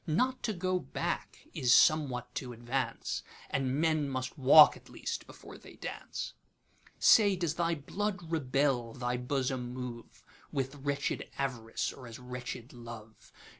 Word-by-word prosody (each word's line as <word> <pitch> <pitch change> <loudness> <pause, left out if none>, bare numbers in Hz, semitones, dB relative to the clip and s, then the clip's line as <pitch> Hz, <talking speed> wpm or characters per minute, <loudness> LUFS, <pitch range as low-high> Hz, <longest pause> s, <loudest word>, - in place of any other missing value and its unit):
Not 255 +12 +1
to - - 0
go 185 0 0
back 130 - -4
is 125 - +1
somewhat 125 -6 +3
to 125 -1 -4
advance, 120 +1 -2 0.3
And 135 +1 0
men 155 -3 +2
must 130 -1 -3
walk, 150 +2 +8
at - - -16
least, - - -5
before - - -12
they - - -14
dance. - - -6 0.6
Say, 205 -3 +6
does 170 -4 -1
thy 170 0 0
blood 180 +3 -3
rebel, 135 -5 +1
thy 125 -1 -1
bosom 125 -1 -2
moveWith 130 +2 -6
wretched 140 0 -1
Av'rice, 125 -5 -2
or 130 -2 -11
as 115 - -8
wretched 125 -1 -7
Love? 115 -2 -11
130 Hz, 135 wpm, -31 LUFS, 125-155 Hz, 0.6 s, walk